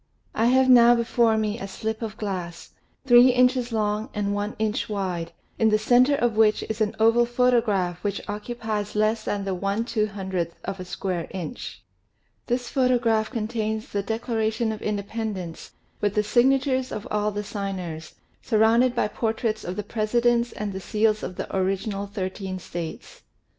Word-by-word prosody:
I 225 +2 +2
have 260 +1 +4
now 240 -1 +7
before 235 -1 +2
me 215 +1 -1
a 195 - -5
slip 220 +3 -4
of 225 -1 -5
glass, 180 -5 -5 0.3
three 245 -1 +8
inches 250 -1 +3
long 215 -1 -1
and 205 -1 -1
one 205 +1 -3
inch 215 0 -1
wide, 180 -5 -3 0.3
in 225 - +4
the 215 - +4
center 245 +6 +4
of 240 -5 0
which 215 -1 +3
is 220 0 -4
an 210 -1 +1
oval 230 +2 +4
photograph 230 -8 +1
which 205 -1 -1
occupies 210 -1 -4
less 215 +1 +1
than 200 -1 -2
the 195 - -1
i 195 +2 -1
2OOth 195 -6 -2
of 195 0 -4
a 185 - -6
square 180 -1 -3
inch. 175 -5 -7 0.6
This 245 0 -1
photograph 240 -4 +2
contains 220 -2 -3
the 200 - -1
Declaration 220 +1 -1
of 215 - -6
Independence 205 -4 -4 0.3
with 205 -1 0
the 210 - +3
signatures 260 +3 +2
of 210 - -5
all 210 0 +1
the 205 0 -4
signers, 185 -6 -5 0.3
surrounded 230 +3 +3
by 235 - +1
portraits 220 0 -2
of 180 - -4
the 210 - -3
Presidents 235 +3 +1
and 210 -2 -4
the 190 - -4
seals 215 +2 +1
of 180 - -5
the - - -5
original 195 +2 -1
thirteen 190 -1 -4
States. 170 -2 -7
215 Hz, 165 wpm, -25 LUFS, 200-235 Hz, 0.6 s, three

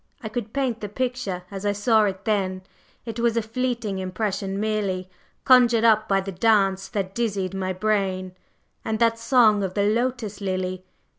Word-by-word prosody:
I 220 - -4
could 220 -1 -4
paint 260 -4 -1
the 210 - -4
picture 245 -6 -3
as 195 0 -6
I 205 0 +1
saw 215 +1 +3
it 195 -1 -4
then! 190 -3 0 0.4
It 230 -1 -5
was 235 -1 +1
a - - +3
fleeting 235 -3 -2
impression 195 +1 -3
merely, 200 -4 -2 0.3
conjured 245 -3 +5
up 220 -1 +4
by 195 -2 +2
the 195 +1 -5
dance 195 -1 +2
that 195 -4 -3
dizzied 200 -5 -2
my 190 -1 -2
brain. 190 -1 -1 0.5
And 220 - -1
that 230 0 +2
song 230 -4 +4
of 190 -2 -3
the 200 - +2
Lotus 225 -1 -1
lily! 185 -1 -3
210 Hz, 170 wpm, -24 LUFS, 190-230 Hz, 0.5 s, conjured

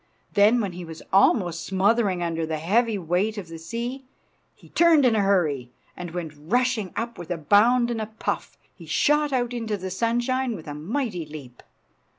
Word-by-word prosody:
Then, 215 +4 +5
when 200 -3 -2
he 180 0 -8
was 165 -1 -9
almost 185 -4 +3
smothering 195 -1 +1
under 165 -1 -2
the 160 0 -2
heavy 215 +7 +1
weight 185 +5 -1
of 185 -5 -6
the 165 0 -8
sea, 235 +10 -5 0.5
he - - -19
turned 330 -5 +5
in 235 -3 +4
a 210 - +3
hurry, 160 -11 +1 0.3
and 175 -1 -6
went 165 -2 -5
rushing 220 +6 0
up 235 -2 -4
with 175 - -8
a 175 - -1
bound 235 - +4
and 225 -2 -2
a 215 - -3
puff. 220 +1 -4 0.2
He - - -14
shot 295 0 +2
out 245 -2 0
into 225 -3 -2
the 185 0 -6
sunshine 240 +4 0
with 160 - -10
a 145 - -5
mighty 180 - -3
leap. 140 -5 -11
200 Hz, 185 wpm, -24 LUFS, 170-235 Hz, 0.5 s, Then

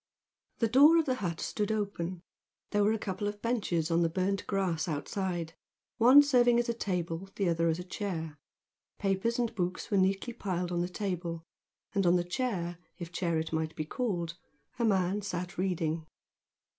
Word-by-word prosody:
The 230 - +2
door 285 +8 +7
of 325 - +3
the 260 - +1
hut 170 -4 -2
stood 210 0 -1
open; 185 -4 -3 0.5
there 205 0 +3
were 210 - +4
a 220 - +1
couple 200 0 -3
of 205 0 -4
benches 190 -8 0
on 165 +1 +3
the 165 - +3
burnt 190 +3 -1
grass 180 -5 0
outside, 170 +2 -3 0.5
one 255 +5 +9
serving 245 -4 +4
as 240 - +1
a 235 - +1
table, 180 -4 -3
the 195 - 0
other 170 0 +2
as 165 -1 +1
a 180 - -5
chair. 170 -6 -4 0.6
Papers 195 +4 0
and 240 -1 0
books 180 -3 -3
were 200 - +3
neatly 195 +5 +1
piled 180 -5 -2
on 175 -1 0
the 175 - -1
table, 180 -4 -3 0.5
and 195 -3 +2
on 175 - +5
the 175 - +2
chair, 175 -3 -2 0.2
if 170 -2 -7
chair 170 -2 0
it 160 +1 -3
might 160 0 -1
be 155 - -3
called, 175 -4 -2 0.4
a 235 - +2
man 195 -1 +2
sat 180 -2 -4
reading. 165 -4 -1
185 Hz, 180 wpm, -30 LUFS, 170-210 Hz, 0.6 s, one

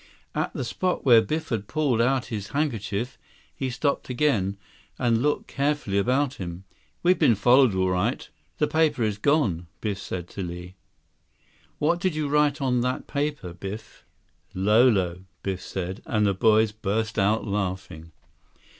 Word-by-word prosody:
At - - -1
the 130 - -2
spot 180 +9 -2
where 120 -4 +8
Biff 155 +6 -3
had 105 -4 -2
pulled 140 -6 +1
out 130 +1 +2
his 100 -3 -3
handkerchief, 120 -5 -2 0.4
he 135 - -2
stopped 135 +3 -1
again, 120 -8 +1 0.4
and 120 -2 +2
looked 145 +2 0
carefully 140 -8 0
about 130 +5 +1
him. 90 0 -6 0.4
"We've 180 0 +4
been 115 - +5
followed, 120 +1 +5
all 95 0 +2
right. 100 +8 -1 0.3
The 150 - +3
paper 155 -6 +2
is 105 -2 -1
gone," 105 - +1
Biff 100 -3 -3
said 90 -3 -5
to 100 - -6
Li. 90 0 -6 1.0
"What 170 +4 +1
did 180 -2 0
you 150 -2 -1
write 150 0 +2
on 125 -2 +2
that 125 +1 -1
paper, 145 - -3
Biff?" 100 +4 -8 0.5
83 95 - -5
"'Lolo,'" 100 -5 +3 0.2
Biff 95 -2 -3
said, 95 +1 -5
and 105 -1 +1
the 100 - +3
boys 110 +1 +4
burst 110 +1 -2
out 105 +3 +2
laughing. 95 -5 -4
110 Hz, 155 wpm, -25 LUFS, 95-140 Hz, 1.0 s, where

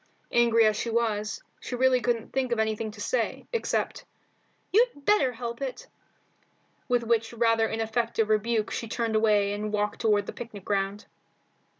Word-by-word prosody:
Angry 230 -1 +4
as 215 -1 +3
she 235 - -2
was, 220 -2 -1 0.2
she 250 - -5
really 255 0 +3
couldn't 235 -2 -1
think 265 -2 0
of 235 - +1
anything 220 0 -1
to 210 0 -12
say, - - -1
except 465 - -1 0.7
"You'd 435 - +2
better 350 -12 +4
help 235 +1 -6
it," 265 -2 -4 1.0
with 245 -2 +2
which 230 0 0
rather 230 -1 +3
ineffective 225 0 -1
rebuke 215 0 +1
she 230 - -3
turned 225 0 -1
away 210 -2 +3
and 210 +1 -3
walked 210 0 -1
toward 210 -3 +3
the - - -6
picnic 215 -5 -9
ground. 200 +1 -1
225 Hz, 160 wpm, -27 LUFS, 215-240 Hz, 1.0 s, Angry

